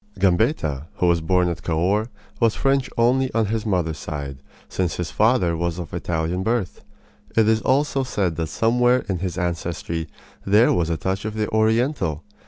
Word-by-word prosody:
Gambetta, 90 Hz, -, +1 dB
who -, -, 0 dB
was 85 Hz, -1 st, +3 dB
born 90 Hz, +2 st, +2 dB
at 85 Hz, -3 st, -3 dB
Cahors, 95 Hz, +7 st, 0 dB, 0.3 s
was 115 Hz, -3 st, +3 dB
French 135 Hz, -1 st, +1 dB
only 125 Hz, +3 st, +3 dB
on 115 Hz, -1 st, +3 dB
his 110 Hz, +1 st, -2 dB
mother's 85 Hz, -6 st, 0 dB
side, 70 Hz, -2 st, -6 dB, 0.3 s
since 90 Hz, -2 st, -2 dB
his 85 Hz, -3 st, -4 dB
father 105 Hz, -, +2 dB
was 85 Hz, 0 st, -2 dB
of 85 Hz, -2 st, -7 dB
Italian 85 Hz, +1 st, -2 dB
birth. 110 Hz, -2 st, -2 dB, 0.5 s
It 110 Hz, -1 st, +5 dB
is 110 Hz, 0 st, +3 dB
said -, -, -14 dB
also 130 Hz, -7 st, +1 dB
that 80 Hz, 0 st, -3 dB
somewhere 120 Hz, +6 st, +2 dB
in 95 Hz, -4 st, -2 dB
his 90 Hz, -1 st, -3 dB
ancestry 85 Hz, -1 st, -3 dB, 0.4 s
there 105 Hz, +4 st, +4 dB
was 85 Hz, -2 st, 0 dB
a 85 Hz, -, 0 dB
touch 95 Hz, +5 st, -2 dB
of 110 Hz, 0 st, -4 dB
the 105 Hz, -1 st, -1 dB
Oriental. 110 Hz, -, +1 dB
95 Hz, 175 wpm, -22 LUFS, 85-115 Hz, 0.5 s, It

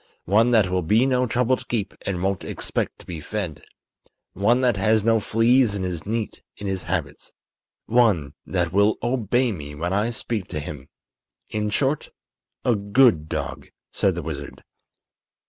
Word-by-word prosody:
One 110 Hz, +6 st, +4 dB
that 110 Hz, -5 st, +4 dB
will 90 Hz, 0 st, +1 dB
be 110 Hz, +9 st, +3 dB
no 125 Hz, -1 st, +2 dB
trouble 125 Hz, +2 st, +2 dB
to -, -, -11 dB
keep 110 Hz, -4 st, -2 dB
and 90 Hz, -2 st, -2 dB
won't 95 Hz, -1 st, 0 dB
expect -, -, -3 dB
to -, -, -15 dB
be 85 Hz, -3 st, -6 dB
fed. 90 Hz, -3 st, -4 dB, 0.7 s
One 115 Hz, +7 st, +2 dB
that 125 Hz, -3 st, +3 dB
has 110 Hz, +2 st, +2 dB
no 115 Hz, 0 st, +4 dB
fleas 115 Hz, +1 st, +3 dB
and 95 Hz, -2 st, -2 dB
is 90 Hz, -1 st, -4 dB
neat 110 Hz, 0 st, -3 dB, 0.2 s
in 105 Hz, -, -7 dB
his 95 Hz, -1 st, -2 dB
habits. -, -, -3 dB, 0.5 s
One 105 Hz, -12 st, +3 dB
that 90 Hz, -2 st, -1 dB
will 100 Hz, +2 st, +4 dB
obey 120 Hz, 0 st, +1 dB
me 75 Hz, -6 st, -7 dB
when 85 Hz, +5 st, -2 dB
I 105 Hz, +4 st, +1 dB
speak 115 Hz, -4 st, -3 dB
to 75 Hz, -, -4 dB
him. 75 Hz, -2 st, -8 dB, 0.6 s
In 105 Hz, 0 st, -1 dB
short, 135 Hz, +7 st, 0 dB, 0.6 s
a 120 Hz, -, +4 dB
good 100 Hz, -, +3 dB
dog," -, -, -4 dB, 0.2 s
said 95 Hz, -3 st, +1 dB
the 85 Hz, -, -4 dB
wizard. 70 Hz, -3 st, -7 dB
105 Hz, 165 wpm, -23 LUFS, 90-120 Hz, 0.7 s, One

